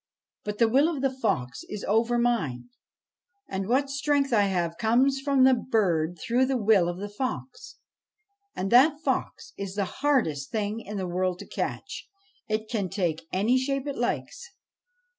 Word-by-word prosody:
But 210 0 -4
the 230 - +4
will 275 +8 +4
of 290 -5 -4
the 270 - +2
fox 130 - -2
is 210 - -6
over 230 +3 +2
mine, 235 - 0 0.8
and 190 0 -3
what 265 +4 +2
strength 275 -1 0
I 205 -3 +4
have 170 -3 -1
comes 255 +6 +3
from 275 -1 +2
the 260 0 +7
bird 180 -9 0
through 245 +9 +1
the 265 -1 +1
will 205 -6 +3
of 175 - -4
the 205 +2 -5
fox. 255 +5 -5 0.8
And 190 +1 -3
that 285 +5 +6
fox - - -2
is 195 -1 -5
the 200 -1 0 0.2
hardest 225 - +1
thing 215 0 -2
in 210 -2 -7
the 190 - -2
world 180 0 -1
to - - -9
catch: - - -5 0.4
it 215 0 -2
can 205 -5 -2
take 170 -5 -2
any 220 +7 +2
shape 275 +1 -2
it 285 -2 -3
likes. 480 - -3
220 Hz, 170 wpm, -27 LUFS, 190-260 Hz, 0.8 s, the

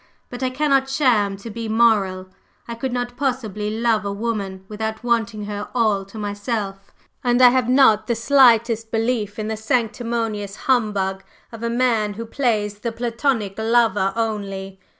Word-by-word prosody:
But 245 +1 -7
I 260 - +1
cannot 270 0 +1
sham 230 -8 +2
to 220 +3 -9
be 225 +1 -5
moral. 205 -5 +2 0.4
I 235 - -5
could 245 +3 -4
not 245 0 -3
possibly 235 -6 -2
love 220 0 +1
a 200 - -3
woman 200 -3 -4
without 220 +1 -4
wanting 225 -3 0
her 205 0 -5
all 215 -5 +2
to 195 +3 -12
myself, 205 -1 -4 0.3
and 245 -1 +2
I 250 -1 +9
have 250 -1 +1
not 225 -5 +5
the 235 - +1
slightest 230 -3 +4
belief 225 -2 -1
in 215 -1 -3
the 220 - -2
sanctimonious 225 -3 -2
humbug 205 -6 +1 0.3
of 230 -1 -9
a 235 - -1
man 230 -4 +1
who 230 +2 -6
plays 215 -5 -1
the 230 +2 -3
Platonic 230 -3 -1
lover 220 -4 +2
only. 195 -4 -3
225 Hz, 160 wpm, -21 LUFS, 205-240 Hz, 0.4 s, I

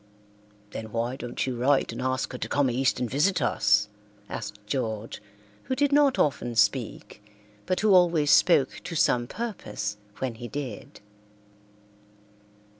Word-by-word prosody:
"Then 110 -1 -7
why 115 +3 -2
don't 120 -2 -4
you 130 -2 -3
write 135 +4 +2
and - - -6
ask 130 0 -1
her 125 - -7
to - - -4
come 140 -3 +2
east 130 +3 +1
and 125 - -1
visit 150 - +1
us?" 105 -5 +2 0.4
asked 105 -2 -6
George, 110 -3 -3 0.4
who 260 - -1
did 285 +1 +2
not 285 -2 +4
often 120 -4 0
speak, 105 -1 0 0.4
but 185 - 0
who 210 -2 +4
always 170 -5 +4
spoke 145 -7 +4
to 170 - -5
some 120 -5 +2
purpose 185 - -5 0.2
when 130 -2 -3
he 120 +2 -8
did. 130 -5 -7
130 Hz, 145 wpm, -26 LUFS, 115-160 Hz, 0.4 s, not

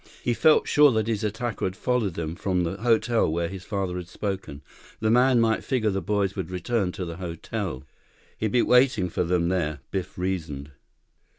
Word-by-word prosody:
He 120 - +1
felt 155 +6 +4
sure 150 -1 +6
that 110 -1 +1
his 110 -2 -1
attacker 110 +2 -3
had 95 - -1
followed 115 -6 0
them 80 0 -4
from 90 -1 0
the 85 +3 -3
hotel 115 -2 +2
where 85 +1 0
his 95 -1 -8
father 95 -3 -3
had 90 -1 -6
spoken. 95 -8 -5 0.4
The 110 0 +1
man 125 +1 +5
might 115 -1 +2
figure 120 -6 0
the 95 0 -1
boys 100 -2 0
would 95 -5 -4
return 95 +1 -1
to 90 - -4
the 85 -1 -6
hotel. 90 - -5 0.5
He'd 110 -1 -2
be 120 - +3
waiting 125 -7 +4
for 90 - -1
them 85 0 +1
there, 75 -6 -1
Biff 95 -2 -4
reasoned. 80 -6 -3
95 Hz, 190 wpm, -25 LUFS, 90-115 Hz, 0.5 s, sure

